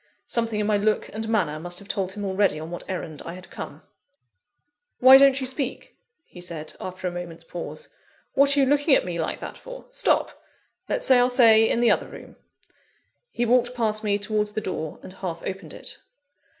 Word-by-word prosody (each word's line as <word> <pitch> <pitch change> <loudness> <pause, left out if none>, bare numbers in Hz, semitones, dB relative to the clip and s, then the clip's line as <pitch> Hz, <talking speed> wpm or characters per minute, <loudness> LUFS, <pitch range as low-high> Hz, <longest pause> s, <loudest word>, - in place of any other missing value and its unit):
Something 230 -2 -1
in 210 - 0
my 210 0 +2
look 210 +1 0
and 220 +1 -4
manner 170 -9 0
must 175 +2 -6
have 200 - -5
told 190 -2 -2
him 205 0 -5
already 190 -5 +1
on 160 +2 -7
what 175 - -6
errand 160 -5 -5
I 170 - -7
had 185 0 -13
come. - - -8 1.1
"Why 260 +1 +9
don't 275 -1 +5
you 260 - -3
speak?" 260 0 -4 0.3
he 180 - -13
said, 165 -3 -6
after 185 0 -5
a - - -2
moment's 170 -1 -7
pause. 175 - -7 0.4
"What 280 +1 +4
are - - +5
you - - +5
looking 285 +1 +4
at - - +2
me 175 -2 -4
like 160 - -2
that - - -7
for? - - -10
Stop! - - +1 0.5
Let's - - -1
say 255 -2 +6
our 245 +1 +4
say 225 -3 +6
in 235 - +1
the 240 - +5
other - - +1
room." - - -12 0.9
He 240 - -1
walked 245 +1 +2
past 220 -2 0
me 205 -1 +1
towards 210 0 -1
the - - -1
door, 160 -6 -5
and 185 - -10
half 180 -4 -6
opened 195 +1 -6
it. - - -9
210 Hz, 200 wpm, -24 LUFS, 180-245 Hz, 1.1 s, Why